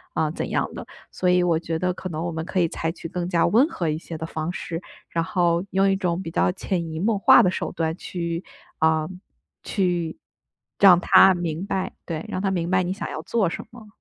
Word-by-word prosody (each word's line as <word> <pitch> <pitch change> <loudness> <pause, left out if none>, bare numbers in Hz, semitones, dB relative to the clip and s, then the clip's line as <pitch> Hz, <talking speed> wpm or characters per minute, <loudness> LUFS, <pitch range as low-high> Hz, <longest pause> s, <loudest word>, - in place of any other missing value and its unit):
嗯， 155 -1 0
怎 - - -4
样 - - -1
的。 - - -7 0.3
所 180 - 0
以 180 0 +4
我 170 -2 +2
觉 165 -1 -3
得 180 0 0
可 185 - -7
能 160 0 -4
我 170 - -2
们 160 0 -4
可 185 - -1
以 170 - +3
采 165 +1 -3
取 165 - -8
更 175 +1 -3
加 170 -2 +3
温 235 - +4
和 175 - -3
一 155 - 0
些 165 0 -8
的 160 - -5
方 160 +1 -3
式， 170 -1 -5 0.3
然 165 -1 -1
后， 175 -1 +1
用 195 +1 +3
一 195 - +3
种 180 -3 -1
比 165 - -5
较 180 - +2
潜 180 -3 -3
移 160 - -4
默 215 +4 +1
化 - - +7
的 180 - +4
手 - - -3
段 165 -2 -2
去 170 0 -4 0.4
嗯， 160 +3 +1 0.4
去 175 -5 -1 0.6
让 185 -3 +8
他 190 +1 +7
明 170 -1 -3
白 190 -1 -2
对， 165 -2 -3
让 - - -3
他 195 - +1
明 175 -2 -1
白 185 0 +4
你 180 - -2
想 205 - -5
要 - - -5
做 220 -6 +1
什 - - -6
么， 230 -3 -13
175 Hz, 250 characters per minute, -24 LUFS, 165-185 Hz, 0.6 s, 让